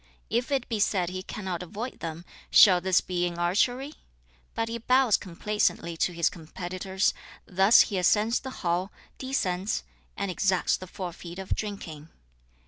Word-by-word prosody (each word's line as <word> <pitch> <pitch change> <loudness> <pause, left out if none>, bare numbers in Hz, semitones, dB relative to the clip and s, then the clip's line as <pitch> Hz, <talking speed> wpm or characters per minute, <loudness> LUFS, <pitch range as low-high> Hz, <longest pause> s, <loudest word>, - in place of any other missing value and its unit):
If 240 +5 0
it 270 -3 0
be 225 -3 -2
said 185 -4 +1
he 185 0 -4
cannot 185 -2 -5
avoid 215 +8 -6
them, 165 +1 -6 0.2
shall 180 -3 +7
this 185 0 +3
be 180 -1 -1
in 175 -1 -6
archery? 245 - +1 0.6
But 225 - -1
he 230 +1 -4
bows 250 -1 +4
complaisantly 185 -2 -1
to 180 - +1
his 170 -1 +1
competitors; 185 +4 -2 0.3
thus 195 +4 +6
he 195 -4 0
ascends 215 +6 +3
the 265 - -7 0.2
hall, 175 +3 0 0.3
descends, 205 -7 -1 0.3
and 200 -1 -2
exacts 185 0 +1
the 185 - -8
forfeit 175 -1 -7
of 190 -1 -2
drinking. 165 -7 -6
190 Hz, 150 wpm, -27 LUFS, 175-220 Hz, 0.6 s, shall